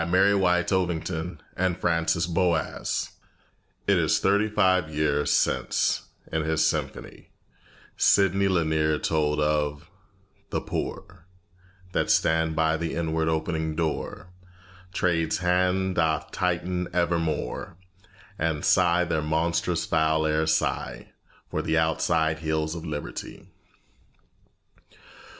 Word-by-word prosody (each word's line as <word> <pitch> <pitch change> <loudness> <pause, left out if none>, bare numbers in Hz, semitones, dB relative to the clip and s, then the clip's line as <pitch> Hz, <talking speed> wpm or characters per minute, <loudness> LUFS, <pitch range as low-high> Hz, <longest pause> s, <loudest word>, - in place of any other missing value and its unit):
CHAPTER 95 +4 +4
II - - +3
WHERE 90 -3 +3
THE 85 -2 -2 0.2
NEGRO 85 -1 0
LIVES 80 -5 -2 0.7
It - - +3
is - - +2
thirty 100 +2 +2
five 95 -6 +2
years 75 -1 +1
since, - - +1 0.2
in 80 - 0
his 80 0 +1
Symphony, - - -3 0.7
Sidney 100 0 +4
Lanier 80 -4 +1
told 75 -1 0
of 75 -1 -1 0.6
"The - - -1
poor 85 - -6 0.6
That - - 0
stand 80 0 +2
by 80 0 +2
the 80 0 -3
inward 80 -1 0
opening 80 0 -1
door 85 +2 -3 0.6
Trade's 85 -4 0
hand 90 +1 +1
doth 80 -3 0
tighten 90 0 -1
evermore, 85 -2 -1 0.6
And 80 -2 -1
sigh 90 -1 +4
their 80 -3 -1
monstrous 85 +2 0
foul 80 -1 +1
air 80 0 +1
sigh 80 0 -1 0.4
For - - -1
the 80 0 0
outside 80 0 +1
hills 80 0 -1
of 85 -1 -7
liberty." 75 -1 -7
80 Hz, 110 wpm, -26 LUFS, 80-90 Hz, 0.7 s, CHAPTER